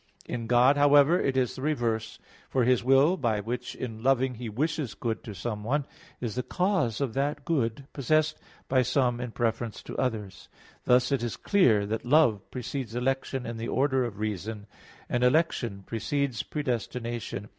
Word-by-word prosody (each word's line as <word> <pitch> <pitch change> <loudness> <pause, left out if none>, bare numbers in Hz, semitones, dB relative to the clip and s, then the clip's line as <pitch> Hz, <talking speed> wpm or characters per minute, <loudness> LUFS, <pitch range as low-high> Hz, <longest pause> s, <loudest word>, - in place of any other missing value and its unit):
In 115 -2 -4
God, 125 +4 +5
however, 145 +3 +6
it 130 -1 0
is 125 -2 +1
the - - -7
reverse. 115 -7 -1 0.3
For 130 - +2
His 125 0 +3
will, 135 +8 +4
by 115 - 0
which 120 +4 -4
in 115 -3 -6
loving 130 0 +2
He 120 -1 -6
wishes 140 0 -2
good 115 +1 -3
to 105 - -7
someone, 115 - -2 0.3
is 115 -4 -3
the 125 - -1
cause 180 - 0
of 130 -5 -1
that 140 +1 -1
good 135 -6 -1
possessed 155 +3 +1 0.3
by 130 -1 +3
some 125 -1 +1
in 125 - -3
preference 115 -1 -2
to - - -8
others. 110 -7 -3 0.4
Thus 125 +2 +4
it 135 -4 +1
is 120 -2 -3
clear 115 - +3
that 110 +2 -3
love 125 -6 +4
precedes 125 -1 -5
election 130 0 -1
in 115 0 -5
the 115 +1 -4
order 130 0 +1
of 115 -5 -4
reason, 105 0 -4 0.4
and 120 0 0
election 125 -7 +1
precedes 130 +1 -1
predestination. 120 -6 -4
125 Hz, 165 wpm, -28 LUFS, 115-140 Hz, 0.4 s, however